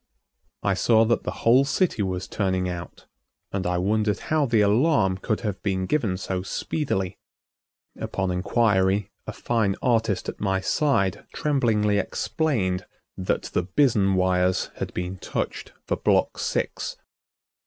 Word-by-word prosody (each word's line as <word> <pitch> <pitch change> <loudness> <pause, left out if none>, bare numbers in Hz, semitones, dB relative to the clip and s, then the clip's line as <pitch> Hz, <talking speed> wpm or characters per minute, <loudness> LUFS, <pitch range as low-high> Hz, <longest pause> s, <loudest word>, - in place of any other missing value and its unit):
I 100 - +2
saw 110 +3 +4
that 115 +1 +1
the - - -1 0.2
whole 125 +4 +6
city 140 - 0
was 95 -1 -2
turning 95 -2 0
out, 85 -1 -7 0.5
and 95 -2 -2
I 90 0 0
wondered 105 +2 +1
how 155 -2 0
the 115 -3 +3
alarm 105 - +3
could 110 +2 -1
have 105 -3 -3
been 95 -2 -1
given 105 -6 0
so 95 -1 -3
speedily. 95 - -2 0.8
Upon 95 -1 -2
inquiry, 95 0 +1 0.2
a - - -3
fine 110 -5 0
artist 115 -5 +1
at - - -5
my 95 -2 +1
side 100 - 0
tremblingly 110 -8 +2
explained 95 - -1 0.3
that 95 - -1
the - - +2
Bizen 100 0 +2
wires 90 0 +1
had - - -4
been 90 +1 -4
touched - - -4
for - - -1
block - - +1
six. - - -2
100 Hz, 140 wpm, -25 LUFS, 95-115 Hz, 0.8 s, whole